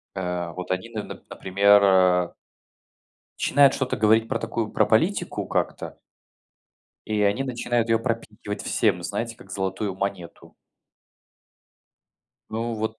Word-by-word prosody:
Э, 90 -2 -3
вот 90 0 -5
они 95 +5 -2
нап 110 -2 -7
например, 100 +2 +4
э 90 -2 +4 1.1
начинают 140 -1 +4
что-то 130 -1 -1
говорить 110 +1 +3
про - - -1
такую - - -3
про - - +2
политику - - +1
как-то - - -2 1.1
и 105 -1 0
они 100 +6 +2
начинают 120 -2 -1
её 115 0 +3
пропихивать 115 -3 -4
всем, 95 -6 +1
знаете, 115 +5 -4
как 95 - -16
золотую 95 +1 -2
монету. 95 -3 -5 2.0
Ну 115 +1 -2
вот 110 +1 -3
105 Hz, 120 wpm, -24 LUFS, 95-115 Hz, 2.0 s, например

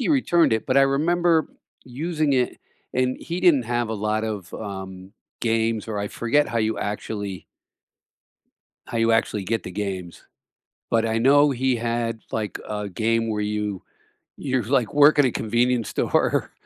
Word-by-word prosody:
he - - -1
returned 175 - +3
it, 110 - 0
but - - +1
I - - +7
remember 160 +4 +2 0.4
using 150 +3 -1
it, 125 -2 0 0.3
and 130 0 0
he 170 +2 -4
didn't 165 -9 +4
have 120 -1 -2
a - - -2
lot 110 +1 -1
of, 105 -5 -5
um, 95 -2 -7 0.3
games 115 -1 0
or 110 -2 -4
I 100 0 -2
forget 145 +5 +1
how 115 - -1
you 110 0 0
actually 105 -2 -4 1.4
how 115 - -3
you 115 0 +3
actually 105 -3 0
get 115 +3 -1
the 90 - -7
games, 95 -3 -5 0.7
but 115 -1 +2
I 110 0 0
know 145 +4 +5
he 130 0 0
had, 115 -1 -2
like, 110 -2 -3
a 105 -1 -3
game 115 +4 0
where 105 -1 -1
you 105 -2 -3 0.6
you, 130 -3 0
like, 125 0 0
work 145 +1 +6
in 145 - +6
a 125 - 0
convenience 120 +1 0
store, - - 0
115 Hz, 165 wpm, -23 LUFS, 105-130 Hz, 1.4 s, I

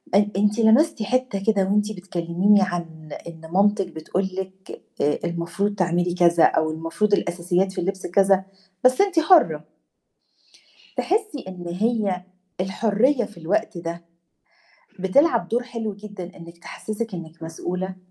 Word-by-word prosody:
أ 205 0 +4
أنتِ 210 +2 +2
لمستِ 230 +3 +4
حتّة 250 -4 -1
كده 210 -3 +3
وأنتِ 210 +2 +1
بتكلّميني 185 +1 +1
عن 165 -4 -4 0.2
إن 165 -1 -10
مامتِك 200 0 +3
بتقول 175 +3 -3
لِك 190 0 -7 0.2
آآ، 150 +1 +1
المفروض 170 +4 -2
تعملي 175 -1 +1
كذا 170 -2 +4
أو 155 0 +3
المفروض 165 +6 -1
الأساسيات 180 +1 +1
في 185 -2 -4
اللبس 190 +1 -3
كذا، 190 +1 +3 0.4
بس 255 +7 +5
أنتِ 385 -4 +3
حُرّة. 240 - +4 1.3
تحسّي 405 - -1
إن 180 -2 -8
هي 200 -1 0 0.4
الحُرّية 225 +7 +2
في 205 -3 -15
الوقت 200 +4 -1
ده 170 0 -6 0.9
بتلعب 235 - +3
دور 240 +2 0
حلو 230 -4 -5
جدًا 200 -3 -9
إنِك 170 -1 -12
تحسّسِك 215 +3 -6
إنِك 165 -1 -9
مسؤولة، 180 +3 -4
190 Hz, 135 wpm, -23 LUFS, 170-215 Hz, 1.3 s, بس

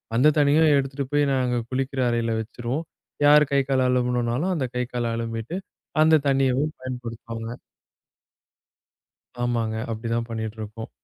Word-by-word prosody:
அந்தத் 150 +5 +4
தண்ணிய 145 +2 +4 0.2
எடுத்துட்டு 135 0 -2
போய் 145 0 +4
நாங்க 125 -2 +1
குளிக்கிற 135 +1 -2
அறையில 115 -1 0
வெச்சிருவோம். 120 +7 -4 0.4
யார் 150 +1 +7
கைக்கால் 135 -2 +2
அழும்பணும்னாலும் 125 +5 +1
அந்தக் 130 -7 -2
கைக்கால் 120 -1 -2
அலம்பிட்டு 115 +7 -4 0.5
அந்தத் 155 -2 +4
தண்ணியவும் 135 +2 +2
பயன்படுத்துவாங்க. 115 -2 -6 1.9
ஆமாங்க. 115 -2 0 0.2
அப்டி 115 +1 -5
தான் 115 0 -1
பண்ணிட்டு 110 -1 -4
இருக்கோம். 110 +1 -7
125 Hz, 120 wpm, -24 LUFS, 115-140 Hz, 1.9 s, யார்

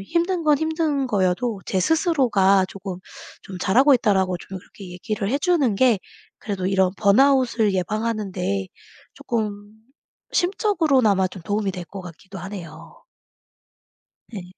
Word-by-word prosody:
힘든 340 - -1
건 300 -2 +4
힘든 315 -3 -1
거여도 205 0 0
제 190 - 0
스스로가 215 - +3
쪼금 190 -2 -7 0.4
좀 190 - -9
"잘하고 260 +10 +4
있다."라고 190 -6 +1
좀 190 +2 -8
그렇게 185 0 -13
얘기를 200 +3 -4
해 275 - +1
주는 295 - +2
게 240 -1 +3 0.4
그래도 195 -4 -4
이런 190 -1 +2
번아웃을 235 0 +3
예방하는 215 +2 -2
데 195 +1 -2 0.5
쪼끔 210 -6 -4 0.6
심적으로나마 310 - +2
좀 185 - -11
도움이 205 +3 -1
될 180 -1 -6
것 195 -1 -9
같기도 185 +3 -11
하네요. 185 -4 -10 1.3
네. 200 -4 -6
205 Hz, 285 characters per minute, -22 LUFS, 190-270 Hz, 1.3 s, 건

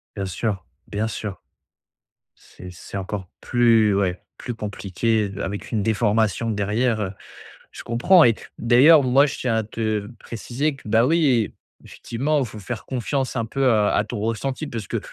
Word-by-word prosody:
Bien 100 -2 -3
sûr. 95 0 -3 0.2
Bien 105 +2 -2
sûr. 105 -3 -5 1.0
C'est 90 - -13
c'est 90 +2 -8
encore 95 0 -5
plus 115 -4 +3
ouais, 95 -2 0 0.2
plus 125 - -5
compliqué 105 0 -1
de 100 +1 -7
avec 100 +1 -5
une 110 -3 0
déformation 110 0 +1
derrière, 105 0 0 0.6
je - - -10
comprends 150 +10 +5
et 115 - +5 0.2
d'ailleurs, 135 +7 +6
moi, 135 +3 +5
je 140 - -5
tiens 125 -3 0
à 110 - +1
te 110 -1 -2
préciser 130 +6 -3
que, 130 - -17
bah, 115 +3 +4
oui, 140 -8 +2 0.3
effectivement, 145 +6 -2
il 130 - -1
faut 110 -1 -10
faire 110 +3 -6
confiance 130 +1 -2
un 115 - -1
peu, 135 +4 -3
heu, 130 - +5
à 105 -1 +2
ton 120 - -5
ressenti 115 +7 -2
parce 115 -8 -5
que - - -1
110 Hz, 165 wpm, -23 LUFS, 105-125 Hz, 1.0 s, d'ailleurs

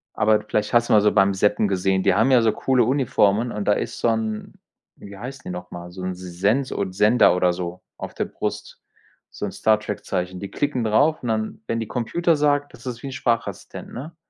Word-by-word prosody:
Aber 110 0 +3
d 105 - -14
vielleicht 105 - -1
hast 120 0 +3
du - - +4
mal 105 - +6
so 105 - +3
beim 100 -1 +3
Zappen 105 +2 +2
gesehen. 95 0 +1
Die - - +4
haben 110 +8 +3
ja 125 -2 +6
so 115 -1 +3
coole 130 +2 +2
Uniformen 120 -3 +2
und 105 -1 -4
da 105 - +5
ist - - -4
so - - +1
'n 110 -1 -2 0.4
wie 100 0 -11
heißen 130 +5 -8
die - - -6
nochmal, 90 -1 -7
so 90 +1 -8
'n 95 0 -2
S 90 - -12 0.2
Sens 115 +8 +1
od 95 -2 -3
Sender 105 +1 +5
oder 90 0 +3
so 90 0 -6 0.2
auf - - -7
der - - -2
Brust, - - -5 0.5
so - - -9
'n - - -4
Star 110 -1 +2
Trek-Zeichen. 95 -3 -4
Die 100 - -6
klicken 145 -4 -1
drauf 145 +9 +2
und 125 - -5
dann, 110 -1 -2
wenn 115 - -1
die 115 - -4
„Computer“ 165 +10 0
sagt, 145 -1 +1
das 120 0 -14
ist 120 -2 -6
wie - - -4
'n - - -5
Sprachassistent, 120 -3 -3
ne? 150 +7 -8
110 Hz, 230 wpm, -23 LUFS, 95-125 Hz, 0.5 s, mal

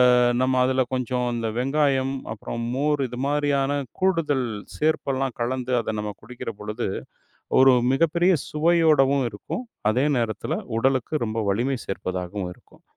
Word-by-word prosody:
அ - - +4 0.2
நம்ம 130 0 +2
அதுல 130 0 +2
கொஞ்சம் 125 0 -1
அந்த 115 -1 -2
வெங்காயம், 135 0 +1 0.2
அப்புறம் 115 +2 -5
மோர் 145 +1 +1
இது 125 - -8
மாதிரியான 145 -1 +1 0.2
கூடுதல் 165 -9 +1 0.3
சேர்ப்பெல்லாம் 135 -4 0
கலந்து 130 +1 -1
அதை 110 - -3
நம்ம 105 0 -3
குடிக்கிற 120 0 -6
பொழுது 105 +2 -3 0.7
ஒரு 130 0 +7 0.2
மிகப்பெரிய 170 +4 +3
சுவையோடவும் 150 -4 +3
இருக்கும். 175 - -6 0.3
அதே 130 +6 +2
நேரத்துல 110 -3 -2 0.2
உடலுக்கு 135 +3 +1
ரொம்ப 110 +1 -2
வலிமை 125 +6 0
சேர்ப்பதாகவும் 90 0 -4
இருக்கும். - - -24
130 Hz, 130 wpm, -24 LUFS, 120-145 Hz, 0.7 s, ஒரு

